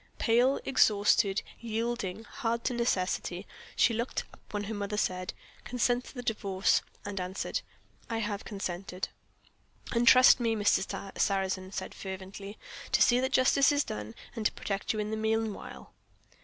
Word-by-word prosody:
Pale, 245 Hz, +4 st, +3 dB
exhausted, 205 Hz, -5 st, +3 dB, 0.2 s
yielding 225 Hz, -3 st, -2 dB
to -, -, -18 dB
hard 235 Hz, 0 st, -1 dB
necessity, 190 Hz, -5 st, -1 dB, 0.3 s
she 230 Hz, -, +4 dB
looked 235 Hz, +3 st, -2 dB
up -, -, -15 dB
when 205 Hz, -1 st, -2 dB
her 215 Hz, +2 st, -4 dB
mother 205 Hz, 0 st, -3 dB
said, 185 Hz, -2 st, -1 dB, 0.3 s
"Consent 245 Hz, 0 st, 0 dB
to -, -, -12 dB
the 245 Hz, -, -5 dB
Divorce," 200 Hz, -4 st, +1 dB, 0.2 s
and 200 Hz, -1 st, -4 dB
answered, 185 Hz, +2 st, -3 dB, 0.5 s
"I 230 Hz, -, -1 dB
have 210 Hz, -2 st, -2 dB
consented." 190 Hz, -2 st, -4 dB, 0.8 s
"And 235 Hz, 0 st, +1 dB
trust 255 Hz, +2 st, +8 dB
me," 230 Hz, -2 st, +1 dB
Mr. 200 Hz, -1 st, 0 dB
Sarrazin 190 Hz, -1 st, 0 dB
said -, -, -5 dB
fervently, 195 Hz, +2 st, -7 dB, 0.4 s
"to -, -, +5 dB
see 245 Hz, 0 st, +5 dB
that 260 Hz, +1 st, 0 dB
Justice 275 Hz, +2 st, +5 dB
is 290 Hz, 0 st, +2 dB
done, 105 Hz, +1 st, -6 dB, 0.2 s
and 225 Hz, -, -3 dB
to -, -, -5 dB
protect 195 Hz, 0 st, -2 dB
you 220 Hz, -, -3 dB
in 210 Hz, 0 st, -2 dB
the 220 Hz, -, -1 dB
meanwhile." 220 Hz, -1 st, -2 dB
210 Hz, 155 wpm, -30 LUFS, 195-235 Hz, 0.8 s, trust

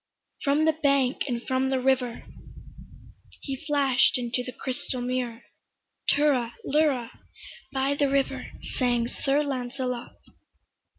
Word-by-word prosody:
From 290 Hz, +2 st, +3 dB
the 320 Hz, -, +4 dB
bank 280 Hz, -4 st, +2 dB
and 240 Hz, -2 st, -2 dB
from 260 Hz, 0 st, +1 dB
the 265 Hz, -1 st, +1 dB
river 255 Hz, -2 st, +1 dB, 1.2 s
He 275 Hz, -, -3 dB
flashed 275 Hz, -4 st, +4 dB
into 245 Hz, 0 st, -1 dB
the 250 Hz, -, -5 dB
crystal 255 Hz, 0 st, -3 dB
mirror, 245 Hz, -1 st, -2 dB, 0.7 s
"Tirra 260 Hz, -6 st, +2 dB
lirra," 275 Hz, -5 st, +2 dB, 0.6 s
by 270 Hz, +1 st, +1 dB
the 285 Hz, -1 st, +1 dB
river 275 Hz, 0 st, 0 dB, 0.3 s
Sang 240 Hz, -2 st, +2 dB
Sir 275 Hz, +4 st, +1 dB
Lancelot. 255 Hz, -2 st, -3 dB
265 Hz, 115 wpm, -27 LUFS, 245-280 Hz, 1.2 s, the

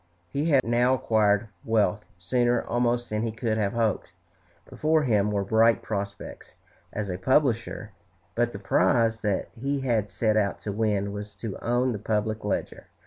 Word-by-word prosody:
He 145 Hz, +2 st, -1 dB
had 135 Hz, -4 st, +4 dB
now 120 Hz, +2 st, +3 dB
acquired 105 Hz, -3 st, +2 dB
wealth, 105 Hz, -2 st, +1 dB
sooner 120 Hz, +6 st, +1 dB
almost 120 Hz, 0 st, 0 dB
than 105 Hz, 0 st, -1 dB
he 115 Hz, 0 st, -1 dB
could 110 Hz, 0 st, -2 dB
have 100 Hz, -2 st, 0 dB
hoped. 110 Hz, -6 st, -1 dB, 0.5 s
Before 155 Hz, 0 st, +1 dB
him 105 Hz, -5 st, +2 dB
were 100 Hz, -1 st, 0 dB
bright 110 Hz, +3 st, +3 dB
prospects 100 Hz, -1 st, -6 dB, 0.4 s
as 105 Hz, -1 st, -3 dB
a 90 Hz, -, -4 dB
publisher; 115 Hz, -3 st, +1 dB, 0.4 s
but 120 Hz, +2 st, +1 dB
the 100 Hz, -, -7 dB
prize 110 Hz, +4 st, +2 dB
that 100 Hz, -3 st, -1 dB
he 135 Hz, +3 st, -2 dB
had 115 Hz, -6 st, 0 dB
set 110 Hz, +2 st, +1 dB
out 100 Hz, -2 st, 0 dB
to 105 Hz, -, -4 dB
win 100 Hz, -1 st, 0 dB
was 105 Hz, 0 st, -7 dB
to 105 Hz, 0 st, -6 dB
own 120 Hz, +2 st, +1 dB
the 105 Hz, -, -4 dB
"Public 110 Hz, +1 st, -1 dB
Ledger." 105 Hz, -, -3 dB
110 Hz, 165 wpm, -26 LUFS, 105-120 Hz, 0.5 s, had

